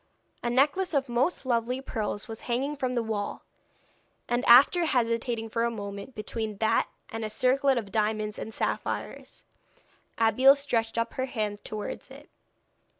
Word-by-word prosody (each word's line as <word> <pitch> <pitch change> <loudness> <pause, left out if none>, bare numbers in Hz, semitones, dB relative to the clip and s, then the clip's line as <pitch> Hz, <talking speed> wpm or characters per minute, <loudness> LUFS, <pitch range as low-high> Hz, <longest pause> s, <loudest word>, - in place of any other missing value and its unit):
A 240 - -1
necklace 290 +8 +2
of 275 -2 +1
most 260 +6 0
lovely 245 +1 0
pearls 215 -5 -4
was 225 -1 -7
hanging 270 +5 0
from 255 -3 -2
the 235 - +1
wall, 215 -2 -3 0.8
and 240 +1 0
after 280 +8 +7
hesitating 230 -4 0
for 230 +1 -1
a 235 - +2
moment 205 +2 -7
between 215 0 -4
that 220 +1 +2 0.2
and 225 0 -5
a 215 - -2
circlet 260 +4 +2
of 210 -4 -4
diamonds 215 -1 -1
and 220 - -6
sapphires, - - -4 0.7
Abeille 240 +5 +6
stretched 235 -6 0
up 230 - -1
her 260 - -1
hand 210 -4 -3
towards 215 -1 -6
it. - - -14
235 Hz, 150 wpm, -28 LUFS, 220-260 Hz, 0.8 s, after